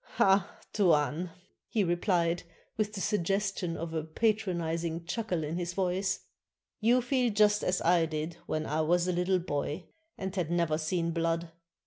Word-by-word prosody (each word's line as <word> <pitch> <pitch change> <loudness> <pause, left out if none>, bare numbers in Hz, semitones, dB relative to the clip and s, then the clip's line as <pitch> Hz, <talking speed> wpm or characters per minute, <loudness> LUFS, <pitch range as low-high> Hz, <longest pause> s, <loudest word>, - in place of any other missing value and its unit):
"Ah, 195 0 +3 0.2
Tuan," 170 -3 +2 0.4
he 215 - +2
replied, 175 -1 +1 0.3
with 215 -1 -1
the 205 - -4
suggestion 195 -3 0
of 165 0 -5
a 160 -1 -1
patronizing 170 -3 -1
chuckle 180 -3 -2
in 155 +3 -3
his 175 0 -3
voice, 190 0 0 0.3
" - - -62
you 240 +3 +4
feel 245 -1 +2
just 210 0 +4
as 180 - 0
I 170 -1 +4
did 155 +2 -4
when 155 0 -1
I 155 +2 0
was 175 +3 +2
a - - +2
little 180 +2 +2
boy 155 -1 -3 0.3
and 190 0 -4
had 175 -5 -1
never 170 -3 +1
seen 170 +1 0
blood. 165 0 -1
175 Hz, 160 wpm, -30 LUFS, 165-195 Hz, 0.4 s, you